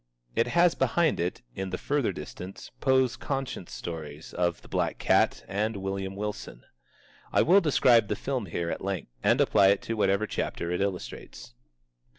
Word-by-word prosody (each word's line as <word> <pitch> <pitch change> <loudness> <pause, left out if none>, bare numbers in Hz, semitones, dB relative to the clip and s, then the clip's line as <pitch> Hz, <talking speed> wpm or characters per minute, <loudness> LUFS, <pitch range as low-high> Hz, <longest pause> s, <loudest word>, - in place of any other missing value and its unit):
It 115 - +2
has 175 0 +6
behind 170 -2 +1
it, 90 +2 -2
in 95 0 -4
the - - -3
further 145 -4 0
distance, 95 +2 -9
Poe's 130 -2 +3
conscience 135 -10 -4
stories 80 -2 -7
of 85 -2 -1
The - - -14
Black - - -1
Cat, - - +2
and 105 +2 -1
William 95 0 -3
Wilson. 105 -11 -5 0.7
I - - +4
will 190 +5 +6
describe 125 - +4
the - - -1
film 130 -7 -3
here 85 0 -2
at - - -5
length, 95 -9 -3
and - - +3
apply 95 - +5
it 100 0 +3
to 115 - -3
whatever 100 -1 +2
chapters 85 -4 -3
it 90 - -1
illustrates. 90 -10 -5
100 Hz, 165 wpm, -28 LUFS, 90-125 Hz, 0.7 s, has